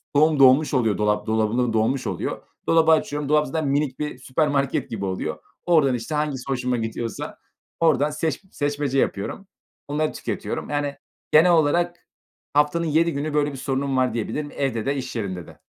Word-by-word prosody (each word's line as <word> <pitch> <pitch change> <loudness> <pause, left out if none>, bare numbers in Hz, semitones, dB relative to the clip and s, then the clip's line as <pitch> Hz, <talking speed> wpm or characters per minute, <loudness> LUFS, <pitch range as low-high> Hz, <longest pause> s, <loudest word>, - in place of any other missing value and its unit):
doğum 155 0 +4
dolmuş 135 +3 +6
oluyor, 115 -6 +2
dolap 105 0 0
dolabım 110 +1 +1
da 125 -2 +1
dolmuş 115 +4 +1
oluyor. - - -3 0.3
Dolabı 165 -1 +5
açıyorum, 150 -2 +1
dolap 150 0 +3
zaten 155 +2 -2
minik 140 -1 0
bir 150 -3 -3
süpermarket 140 +1 0
gibi 100 -3 -4
oluyor. 95 -1 -3 0.3
Oradan, 155 -7 +4
işte, 120 +6 -4
hangisi 150 -4 -1
hoşuma 125 -1 0
gidiyorsa, 115 0 -4 0.4
oradan 150 -3 +3
seç 150 +1 -2
seçmece 145 -2 -1
yapıyorum. 105 - -2 0.4
Onları 150 +2 -1
tüketiyorum, - - -4
yani, 145 -1 -2 0.3
genel 165 +4 +6
olarak 175 +2 +2 0.5
haftanın 150 +3 +2
7 165 +2 +2
günü 145 +2 -3
böyle 145 -1 +1
bir 135 - -8
sorunum 135 0 -1
var 130 -2 +2
diyebilirim, 145 +6 -3
evde 125 -6 -1
de 140 - 0
iş 130 -2 -5
yerinde 95 -6 -4
de. - - -16
140 Hz, 170 wpm, -23 LUFS, 125-150 Hz, 0.5 s, dolmuş